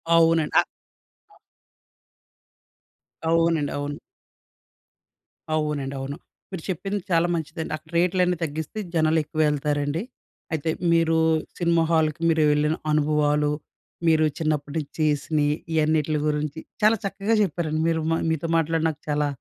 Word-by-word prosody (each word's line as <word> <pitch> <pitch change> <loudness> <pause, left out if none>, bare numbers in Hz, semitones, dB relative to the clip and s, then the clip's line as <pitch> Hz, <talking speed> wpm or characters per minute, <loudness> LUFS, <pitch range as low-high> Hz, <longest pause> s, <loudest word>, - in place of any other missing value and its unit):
అవునండి. 165 -1 +4
అ - - +7
అ - - -4 2.7
అవునండి. 165 -3 +2
అవును. 145 0 -4 1.6
అవునండి. 150 -3 -2
అవును. 135 +2 -5 0.3
మీరు 180 -4 -6
చెప్పింది 195 +3 -2
చాలా 170 0 +3
మంచిదండి. 160 0 -4
అక్కడ 155 +1 -22
రేట్లన్నీ 180 0 +2
తగ్గిస్తే, 160 +6 -4
జనాలు 160 -1 +3
ఎక్కువెళ్తారండి. 150 0 0 0.5
అయితే 160 0 -1 0.2
మీరూ, 165 -1 +3 0.4
సినిమా 170 -1 +2
హాల్‌కి 160 -1 +1
మీరు 160 -1 +3
వెళ్ళిన 150 +1 +2 0.2
అనుభవాలు, 150 -1 +2 0.6
మీరు 160 -1 +4
చిన్నప్పటి 150 -2 -1
నుంచి 150 -3 -4
చేసిని, 150 0 +1 0.3
ఇయన్నిట్ల 155 -1 +2
గురించి 150 0 -2 0.2
చాలా 220 +2 +5
చక్కగా 200 +3 0
చెప్పారండి. 155 -3 -1
మీరు 165 -1 +1 0.3
మీతో 160 +1 -1
మాట్లాడి 165 0 +1
నాకు 150 -1 -7
చాలా 150 0 +1
155 Hz, 115 wpm, -24 LUFS, 150-165 Hz, 2.7 s, అ